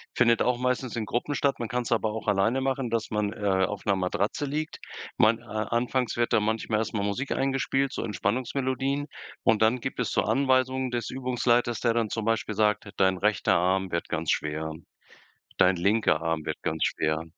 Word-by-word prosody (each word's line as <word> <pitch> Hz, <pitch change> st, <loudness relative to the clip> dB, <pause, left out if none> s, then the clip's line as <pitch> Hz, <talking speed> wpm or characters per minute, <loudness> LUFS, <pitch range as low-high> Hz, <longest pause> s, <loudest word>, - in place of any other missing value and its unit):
findet 115 Hz, -1 st, +4 dB
auch 125 Hz, -1 st, +2 dB
meistens 125 Hz, -1 st, -1 dB
in 110 Hz, -2 st, -2 dB
Gruppen 125 Hz, +7 st, -2 dB
statt. 140 Hz, 0 st, +1 dB
Man 120 Hz, -, -2 dB
kann's 125 Hz, -1 st, -2 dB
aber 110 Hz, -2 st, +1 dB
auch 110 Hz, -, -6 dB
alleine 105 Hz, +6 st, +2 dB
machen, 135 Hz, -2 st, -1 dB
dass 115 Hz, -1 st, -1 dB
man, 105 Hz, -1 st, -1 dB
äh, 100 Hz, -3 st, +1 dB
auf 105 Hz, +1 st, -6 dB
'ner 100 Hz, -2 st, +3 dB
Matratze 95 Hz, +8 st, -1 dB
liegt. 155 Hz, +3 st, -3 dB, 0.4 s
Man 115 Hz, +1 st, +4 dB
a 110 Hz, -2 st, -3 dB
anfangs 125 Hz, +1 st, 0 dB
wird 120 Hz, 0 st, +1 dB
da -, -, +5 dB
manchmal 110 Hz, 0 st, 0 dB
erst 110 Hz, -, -3 dB
mal 105 Hz, -2 st, -1 dB
Musik 105 Hz, +7 st, -2 dB
eingespielt, 135 Hz, 0 st, 0 dB
so -, -, -3 dB
Entspannungsmelodien. 130 Hz, +7 st, -1 dB, 0.4 s
Und 110 Hz, -1 st, +3 dB
dann 115 Hz, +3 st, +3 dB
gibt 135 Hz, +2 st, -5 dB
es 125 Hz, -, -1 dB
zur -, -, +1 dB
Anweisungen 130 Hz, +1 st, +2 dB
des 120 Hz, -3 st, -2 dB
Übungsleiters, 120 Hz, -2 st, +1 dB
der 115 Hz, -2 st, +2 dB
dann 115 Hz, -2 st, 0 dB
zum 110 Hz, 0 st, -3 dB
Beispiel 110 Hz, -1 st, 0 dB
sagt: 105 Hz, 0 st, +1 dB
„Dein 95 Hz, -1 st, +3 dB
rechter 105 Hz, +2 st, +2 dB
Arm 95 Hz, +1 st, +1 dB
wird 85 Hz, -, -2 dB
ganz 80 Hz, 0 st, -1 dB
schwer, 80 Hz, +1 st, -2 dB, 0.9 s
dein 90 Hz, 0 st, +5 dB
linker 100 Hz, -3 st, +2 dB
Arm 80 Hz, -2 st, -1 dB
wird -, -, -4 dB
ganz 80 Hz, -, -1 dB
schwer. 80 Hz, +1 st, 0 dB
115 Hz, 195 wpm, -27 LUFS, 100-125 Hz, 0.9 s, da